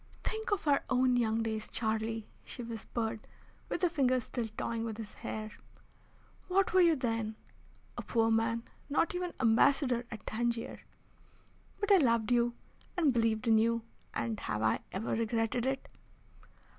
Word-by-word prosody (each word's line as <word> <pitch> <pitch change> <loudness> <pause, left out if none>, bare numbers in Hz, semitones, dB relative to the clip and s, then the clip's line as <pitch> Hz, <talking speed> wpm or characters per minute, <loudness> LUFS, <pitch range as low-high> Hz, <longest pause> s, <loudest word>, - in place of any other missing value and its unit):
"Think 440 +1 -2
of 405 -7 -1
our 285 -1 +4
own 255 -1 +3
young 225 -2 +2
days, 220 -1 -2
Charlie," 220 -1 -1 0.2
she 245 - -7
whispered, 225 -1 -4 0.4
with - - -2
her - - +6
fingers 255 -6 +2
still 235 -1 -3
toying 230 -1 -2
with 225 -2 -4
his 220 -2 -7
hair. 215 0 -5 1.0
"What 380 +1 +2
were 375 - +6
you 335 -2 +6
then? 225 -4 -1 0.6
A - - -2
poor 225 -1 +2
man, 225 +1 +1 0.3
not 310 +4 +2
even 360 0 -2
Ambassador 250 +1 +4
at 220 -4 -8
Tangier. 235 +1 -2 1.0
But 410 0 0
I 395 - +9
loved 235 - +2
you, 240 0 +3 0.4
and 310 -7 +4
believed 225 -1 +1
in 220 -1 +6
you, 230 +1 +2 0.3
and 115 -2 -2
have 105 +1 -2
I 110 - +3
ever 200 +4 -3
regretted 230 +2 0
it? 265 0 -2
230 Hz, 155 wpm, -32 LUFS, 220-260 Hz, 1.0 s, I